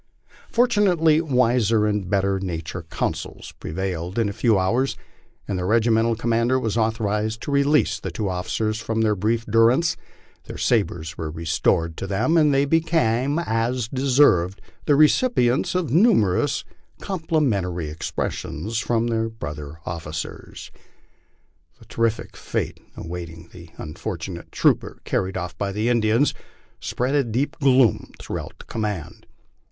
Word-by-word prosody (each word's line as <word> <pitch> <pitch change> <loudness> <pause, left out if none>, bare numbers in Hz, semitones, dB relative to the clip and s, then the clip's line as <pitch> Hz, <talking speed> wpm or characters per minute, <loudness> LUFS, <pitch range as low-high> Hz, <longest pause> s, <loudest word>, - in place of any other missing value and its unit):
Fortunately 185 -10 +3
wiser 120 -6 +2
and 105 -3 -1
better 100 -1 +1
naturcd 85 -2 -5
counsels - - -4
pre - - -7
vailed 90 +1 -3
in 115 -3 +2
a - - -5
few 110 0 +2
hours, 120 +9 +1 0.5
and 95 -2 -2
their 90 - -2
regimental 115 +1 +3
commander 115 +2 +1
was 110 -4 -2
authorized 110 -1 0
to - - -4
re 140 0 +4
lease 150 +2 +2
these - - -5
two 105 - -3
officers 110 +4 -2
from 115 -1 -2
their 110 -1 +2
brief 115 +4 0
durance, 115 +9 +3 0.5
their - - -8
sabres 85 -9 0
were 80 - -3
restored 85 +1 0
to 95 - -4
them, 100 - +1
and 155 -3 +5
they 140 0 +3
became, 145 -4 +1
as 120 -5 -1
they 130 - -6
deserved, 115 -10 +4 0.3
the 145 - +5
recipients 150 - +3
of 180 -8 0
numerous 140 - +3 0.4
compli 160 -5 -1
mentary 90 -7 -1
expressions 85 +6 -3
from 115 0 0
their 115 -1 0
brother 75 -8 -7
officers. 80 -1 -6 1.1
The - - -18
terrible 115 -1 -1
fate - - -4 0.2
awaiting 85 -1 -7
the 85 -1 -13
unfortunate 85 +1 -6
trooper - - +1
carried 95 0 -1
off 90 -1 -5
by 100 -1 -1
the 105 +4 -1
Indians 115 +3 +2 0.5
spread 125 +3 -2
a 145 -1 +3
deep 125 +7 -2
gloom 130 -6 +3
through - - -4
out - - -9
the - - -13
command. 105 -8 -5
110 Hz, 145 wpm, -23 LUFS, 95-130 Hz, 1.1 s, and